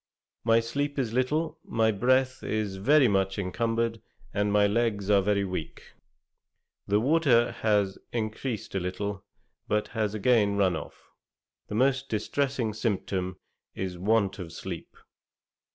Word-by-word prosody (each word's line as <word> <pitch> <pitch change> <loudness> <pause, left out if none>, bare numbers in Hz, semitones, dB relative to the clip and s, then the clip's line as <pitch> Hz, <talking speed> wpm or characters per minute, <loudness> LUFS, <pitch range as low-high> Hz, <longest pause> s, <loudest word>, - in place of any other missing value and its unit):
My 115 0 +4
sleep 145 +5 -2
is 120 -5 -1
little, 155 +6 0
my 110 -1 +1
breath 130 +4 +2
is 105 -3 -2
very 140 +7 +5
much 95 -2 +1
encumbered, 115 +3 -1 0.3
and 105 0 +1
my 105 0 +4
legs 105 -2 +1
are 100 -1 +5
very 100 0 +1
weak. 90 -4 -6 1.0
The 105 +1 +3
water 130 -3 +3
has 105 -3 +1
encreased 115 0 -3
a 95 - 0
little, 95 +2 -4 0.4
but 105 0 0
has 110 -2 -1
again 105 -2 +3
run 95 -3 +3
off. - - -9 0.6
The - - -5
most 135 +3 +2
distressing 115 +2 -1
symptom 95 -4 -2 0.4
is 95 -1 -3
want 100 +2 +1
of 85 -3 -6
sleep.' - - -7
110 Hz, 135 wpm, -28 LUFS, 100-120 Hz, 1.0 s, very